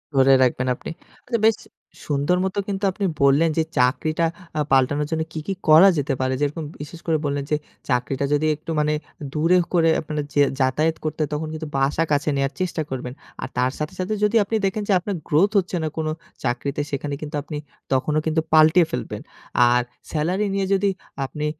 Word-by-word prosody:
ধরে 135 0 +5
রাখবেন, 125 0 +1
আপনি - - -9 0.4
আচ্ছা 235 -3 0
বেশ 225 - +4 0.5
সুন্দর 145 +5 +1
মতো 190 +1 -2
কিন্তু 200 0 -3
আপনি 200 +1 -3 0.2
বললেন, 145 +4 +5
যে 160 - +4 0.2
চাকরিটা 155 +6 +2 0.3
আ - - +1
পাল্টানোর 145 +3 +3
জন্য 160 0 0
কি, 160 - -4
কি 195 - 0 0.2
করা 165 +6 +9
যেতে 140 -1 0
পারে, 130 0 +1
যেরকম 150 +3 -1 0.2
বিশেষ 155 +3 -8
করে 160 -1 +3
বললেন 140 0 -1
যে - - +4 0.3
চাকরিটা 130 +2 0
যদি 150 +2 +2
একটু 160 +2 -8
মানে 150 0 +2 0.4
দূরে 165 +4 +3 0.2
করে 165 -2 +4
আপনার 150 -1 -3
যে 145 - +4 0.2
যাতায়াত 150 +5 +1
করতে 155 - -3
হয়, 150 - 0
তখন 155 +1 -2
কিন্তু 155 -1 -5
বাসা 140 +4 +2
কাছে 145 +1 +2
নেওয়ার 135 0 0
চেষ্টা 175 -3 -1
করবেন। 125 -1 -5 0.3
আর - - -3
তার 125 +1 +2
সাথে, 150 - -3
সাথে 185 +4 -1
যদি 210 +2 +2
আপনি 220 +3 -3
দেখেন, 205 +2 -1
যে - - +5
আপনার 195 +2 -4
গ্রোথ 185 +8 +3
হচ্ছে 185 0 -4
না, - - 0
কোনো 155 -1 -1 0.3
চাকরিতে, 140 +4 -1
সেখানে 145 +1 -3
কিন্তু 150 0 -5
আপনি 150 -1 -6 0.4
তখনও 150 +4 +1
কিন্তু 160 0 +1
পাল্টিয়ে 160 +2 +6
ফেলবেন। - - -4 0.5
আর 125 0 +4 0.3
সেলারি 180 +7 0
নিয়ে 195 -1 0
যদি 195 +1 +2 0.4
আপনি 150 +4 -5
155 Hz, 190 wpm, -23 LUFS, 140-170 Hz, 0.5 s, করা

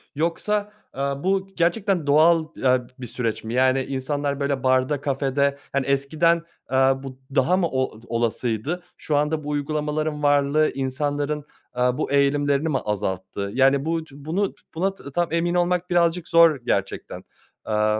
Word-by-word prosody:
Yoksa, 205 +7 -1 0.2
eee, 135 - -8 0.2
bu 190 +5 0
gerçekten 175 -1 +1
doğal, 160 +3 +5
eee, 130 -1 +2 0.2
bir 125 - -6
süreç 115 -1 -3
mi? 110 +1 -5
Yani, 130 +1 +3
insanlar, 140 +1 -2
böyle, 140 -2 -1
barda, 130 +2 +2
kafede, 140 0 0
hani, 140 -1 0
eskiden, 155 +5 +2 0.2
aaa, 135 +1 +2
bu 130 -1 -8 0.2
daha 175 +8 +3
mı 180 -3 +2
o 130 -4 -2
olasıydı? 120 +7 -1
Şu 150 - -2
anda 150 +1 0
bu 150 - -5
uygulamaların 150 +1 -2
varlığı 145 +1 +3
insanların, 145 +2 -2 0.3
aaa, 125 0 +1
bu - - -2
eğilimlerini 140 +2 +2
mi 140 - +1
azalttı? 100 -1 -3
Yani, 135 +2 +3
bu 165 0 0
bunu 160 +8 -2 0.2
buna 190 +4 0
tam 170 0 -3
emin 175 +1 +1
olmak 180 0 +1
birazcık 175 -1 +2
zor 165 -2 +6
gerçekten. 100 -5 -2 0.4
Eee 105 0 +1
145 Hz, 145 wpm, -23 LUFS, 130-165 Hz, 0.4 s, zor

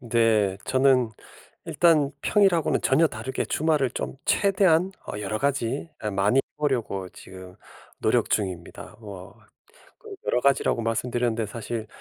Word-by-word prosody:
네. 115 -5 +2
저는 130 -3 +3 0.5
일단 150 -3 +3
평일하고는 190 -6 +2
전혀 165 +1 +4
다르게 120 +1 -4
주말을 150 -5 +1
좀 - - -5
최대한 190 -3 +3 0.2
어 - - -5
여러 105 +1 -3
가지 140 +2 -1 0.3
많이 105 +6 +3
해 - - +4 0.2
보려고 120 -10 -1
지금 95 -1 -12 0.4
노력 - - +1
중입니다. 90 -5 -3
뭐 100 -3 -10 0.6
그 440 -3 -10
여러 125 - +1
가지라고 135 -3 +2
말씀드렸는데 115 0 -1
사실 110 +1 -5
120 Hz, 285 characters per minute, -25 LUFS, 110-145 Hz, 0.6 s, 전혀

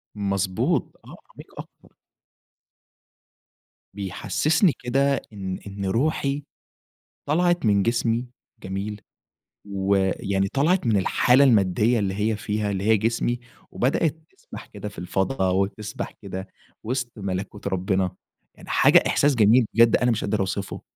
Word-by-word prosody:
مضبوط، 100 -2 -1
آه، - - -11 0.2
عميق - - -13
أكتر. - - -13 2.0
بيحسسني 145 - +1
كده 135 +3 +1
إن 95 -2 -5
إن 100 0 -5
روحي 140 +6 0 0.8
طلعت 175 +1 +1
من 100 -2 +3
جسمي 115 +1 0 0.4
جميل؟ 100 +2 -5 0.7
ويعني 95 0 0
طلعت 155 - +1
من 110 - +3
الحالة 125 +7 +4
المادية 110 0 +3
اللي 95 -2 -1
هي 105 +2 0
فيها، 105 -1 -2
اللي 95 -1 -3
هي 110 +1 +4
جسمي، 115 +3 -1 0.3
وبدأت 145 +4 0 0.2
تسبح - - -11
كده 105 - -8
في 105 - -14
الفضا 95 +3 -1
وتسبح 100 +3 -2
كده 95 -1 -6 0.4
وسط 120 +1 -3
ملكوت 100 0 -5
ربنا. 95 -1 0 0.4
يعني - - -15
حاجة - - +5
إحساس 145 0 +3
جميل 115 +1 +5
بجد 115 0 +5
أنا 125 - +1
مش 115 - -1
أقدر 100 - -1
أوصفه. 95 0 -3
105 Hz, 125 wpm, -24 LUFS, 95-125 Hz, 2.0 s, حاجة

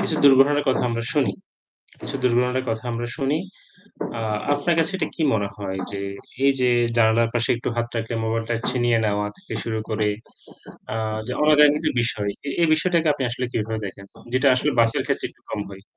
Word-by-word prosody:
কিছু 160 - 0
দুর্ঘটনার 140 +2 +6
কথা 130 - +2
আমরা 115 0 -2
শুনি। 130 -10 +2 0.7
কিছু - - -5
দুর্ঘটনার 125 +1 +2
কথা 110 +1 -2
আমরা 120 +1 -3
শুনি। 140 +3 +1 0.8
আ - - -3 0.3
আপনার 145 +4 +1
কাছে 165 +4 +2
এটা - - -1
কি 165 - -2
মনে 100 -2 0
হয় 95 -2 -4
যে 100 -1 -4 0.4
এই 140 - +6
যে 125 - +3 0.3
জানালার 115 0 +4
পাশে 120 -1 0
একটু 120 - -4
হাত 120 0 -1
রাখলে 115 +1 -3
মোবাইলটা 115 +1 -1 0.2
ছিনিয়ে 120 -2 +2
নেওয়া 105 -1 0
থেকে 190 0 -12
শুরু 110 -1 -2
করে 105 -1 0 0.9
আ - - -3 0.3
যে 125 - -2
অনাকাঙ্ক্ষিত 150 0 +5 0.2
বিষয়। 105 -4 -1 0.2
এ - - 0
এই 170 - +5
বিষয়টাকে 165 +1 +1
আপনি 140 - -3
আসলে 125 +1 -2
কিভাবে 110 0 -2
দেখেন? 100 0 -8 0.3
যেটা 130 +2 +3
আসলে 150 +3 +1
বাসের 115 -1 +3
ক্ষেত্রে - - -1
একটু - - -26
কম 105 - -3
হয়। 95 0 -11
120 Hz, 185 wpm, -23 LUFS, 110-145 Hz, 0.9 s, দুর্ঘটনার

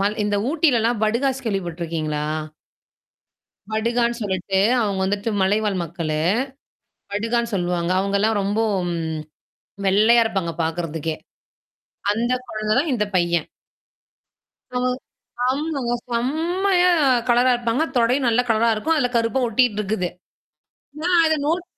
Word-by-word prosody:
மல் 205 +2 0
இந்த 205 0 0
ஊட்டிலல்லாம் 245 -8 +2
படுகாஸ் 260 +4 0
கேள்வி 200 -3 0
பட்டுருக்கீங்களா? 160 -3 -3 1.5
படுகான்னு 235 +2 0
சொல்லிட்டு 190 -1 -1 0.2
அவங்க 200 -3 0
வந்துட்டு 205 +3 -1
மலைவாழ் 205 0 +1
மக்களு. 165 -2 -3 0.9
படுகான்னு 230 +3 -1
சொல்லுவாங்க. 175 -1 -1
அவங்கல்லாம் 200 +2 +1
ரொம்போ, 205 +3 0 1.2
வெள்ளையா 220 +5 +5
இருப்பாங்க 190 -6 -1
பார்கறதுக்கே. 160 -1 -3 1.0
அந்த 235 +3 0 0.2
குழந்த 215 -1 -2
தான் 295 +2 +1
இந்த 210 - +1
பையன். 170 -2 +1 1.2
ஆ. 250 - -3 0.7
ஆமாங்க. 270 -2 -1 0.2
செம்மையா 350 +9 +1 0.4
கலரா 245 +1 +4
இருப்பாங்க 240 +5 0
தொடை 240 +1 +3
நல்ல 235 +1 +3
கலரா 225 +1 +3
இருக்கும். 315 +10 0
அதுல 260 -5 +2
கருப்பா 230 +3 +1
ஒட்டிட்டு 235 -2 +2
இருக்குது. 195 -3 -1 0.9
நான் 350 0 +4
அத 315 - +2
நோட் 345 +3 0
225 Hz, 110 wpm, -22 LUFS, 195-245 Hz, 1.5 s, வெள்ளையா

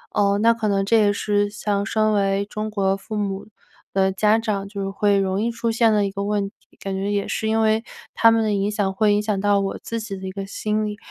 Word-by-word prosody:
呃， 200 -1 +3
那 230 0 +6
可 225 -2 -2
能 195 -1 +1
这 230 +3 +4
也 205 -1 +4
是 205 0 0
像 205 -1 -2
身 215 0 +1
为 200 -1 +1
中 215 +1 -4
国 195 -2 +1
父 205 +2 -7
母 200 -2 -3 0.5
的 190 0 +3
家 210 +3 +3
长 210 -3 -2
就 195 -1 -4
会 200 0 +2
容 195 0 0
易 230 - 0
出 230 0 -2
现 225 0 +3
的 210 -1 +2
一 195 - -3
个 200 0 -4
问 205 -1 -1
题， - - -32
感 195 - -4
觉 195 +2 -2
也 200 -1 -1
是 220 - -2
因 220 0 +2
为 220 0 +2 0.3
他 230 - +5
们 225 0 +3
的 215 -1 0
影 200 0 0
响 205 -2 -1
会 210 +2 +2
影 210 - 0
响 210 -2 -1
到 205 0 +3
我 195 0 -3
自 230 - -4
己 215 -3 -6
的 190 0 -7
一 - - -4
个 195 +1 -5
心 215 +2 -2
理。 210 0 -4
205 Hz, 275 characters per minute, -22 LUFS, 195-215 Hz, 0.5 s, 那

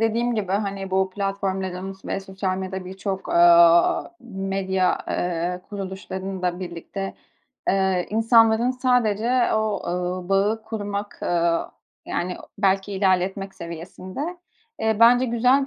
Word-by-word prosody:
dediğim 230 +2 +1
gibi, 195 -4 -2
hani, 195 -1 -2
bu 190 0 +1
platformların 190 -1 -3
ve - - -2
sosyal 190 -1 -3
medya, 190 0 -5
birçok, 190 +1 -5
aaa, 170 0 +6
medya, 195 -4 -1
ııı, 175 +1 -1
kuruluşlarında 190 -2 -4
birlikte, 185 +2 -5 0.6
ııı, 190 -2 +2
insanların 225 +2 +4
sadece 250 -1 +2
o, 215 -1 0
ııı, 180 +1 -2
bağı 205 +3 +2
kurmak, 205 -2 -5
ııı, 170 -1 +1 0.4
yani, 180 +1 -2 0.2
belki 195 0 +1
ilerletmek 190 0 0
seviyesinde, 170 +4 -8 0.6
ııı, 220 -1 +1
bence 245 +2 +7
güzel 250 +4 +3
195 Hz, 110 wpm, -23 LUFS, 185-215 Hz, 0.6 s, bence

